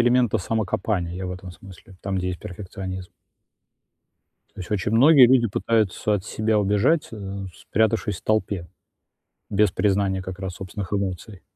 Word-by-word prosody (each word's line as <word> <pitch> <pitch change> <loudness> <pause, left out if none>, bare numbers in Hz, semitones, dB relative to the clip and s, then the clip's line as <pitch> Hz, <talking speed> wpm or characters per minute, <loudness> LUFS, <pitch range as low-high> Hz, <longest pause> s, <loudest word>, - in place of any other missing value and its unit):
элемента 120 -1 +3
самокопания, 95 -3 -1
я 95 0 -4
в 90 - -4
этом 90 0 -8
смысле. 95 +1 -14
Там, 95 -1 -2
где 90 0 -2
есть 90 - -4
перфекционизм. 95 -1 -7 1.5
То - - -9
есть 90 - -8
очень 105 +1 -1
многие 135 +2 +8
люди 125 -2 +4
пытаются 105 -1 +1
от 95 -1 -2
себя 110 0 0
убежать, 105 +11 +2
э, 100 -2 -6
спрятавшись 110 -2 0
в - - -18
толпе, 100 -5 0 0.8
без 105 -2 +3
признания 95 -1 +1
как 95 0 -7
раз 95 -2 -4
собственных 95 0 -6
эмоций. 95 0 -3
100 Hz, 150 wpm, -24 LUFS, 95-110 Hz, 1.5 s, многие